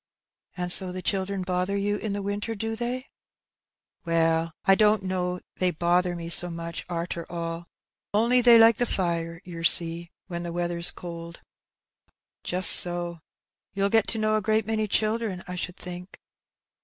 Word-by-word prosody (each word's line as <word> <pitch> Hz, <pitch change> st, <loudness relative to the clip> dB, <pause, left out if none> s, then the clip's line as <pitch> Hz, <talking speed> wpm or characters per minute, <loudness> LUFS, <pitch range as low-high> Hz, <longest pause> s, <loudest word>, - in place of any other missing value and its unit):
"And 180 Hz, 0 st, -2 dB
so 185 Hz, 0 st, +5 dB
the 185 Hz, 0 st, -7 dB
children 195 Hz, -1 st, -2 dB
bother 185 Hz, +2 st, -2 dB
you 205 Hz, +1 st, -1 dB
in 210 Hz, -1 st, -4 dB
the 200 Hz, 0 st, -4 dB
winter, 205 Hz, +3 st, -4 dB
do 225 Hz, +2 st, -4 dB
they? 245 Hz, +3 st, -4 dB, 0.3 s
" -, -, -66 dB
" -, -, -54 dB
Well, 165 Hz, -1 st, 0 dB
I 195 Hz, -, +5 dB
don't 210 Hz, 0 st, +3 dB
know 180 Hz, -1 st, -3 dB, 0.2 s
they 185 Hz, -, +1 dB
bother 175 Hz, +1 st, 0 dB
me 170 Hz, -1 st, -7 dB
so 175 Hz, +1 st, +2 dB
much, 170 Hz, 0 st, -6 dB
arter 170 Hz, 0 st, -4 dB
all; 170 Hz, 0 st, -5 dB, 0.4 s
only 235 Hz, +4 st, +2 dB
they 240 Hz, -1 st, +7 dB
like 225 Hz, -1 st, +6 dB
the 245 Hz, -, 0 dB
fire, 170 Hz, -3 st, -3 dB
yer 170 Hz, -2 st, -9 dB
see, 170 Hz, 0 st, +2 dB, 0.2 s
when 170 Hz, -2 st, -6 dB
the 170 Hz, 0 st, -6 dB
weather's 175 Hz, 0 st, -1 dB
cold." 170 Hz, -1 st, -9 dB, 1.0 s
"Just 180 Hz, +1 st, +4 dB
so; 175 Hz, -1 st, +6 dB, 0.6 s
you'll 200 Hz, 0 st, 0 dB
get 225 Hz, 0 st, +2 dB
to 225 Hz, -, -2 dB
know 215 Hz, 0 st, +1 dB
a -, -, -2 dB
great 215 Hz, +1 st, 0 dB
many 215 Hz, 0 st, -2 dB
children, 215 Hz, -3 st, -1 dB
I 180 Hz, -, -6 dB
should 180 Hz, 0 st, -5 dB
think 180 Hz, +1 st, -10 dB
180 Hz, 170 wpm, -25 LUFS, 170-210 Hz, 1.0 s, they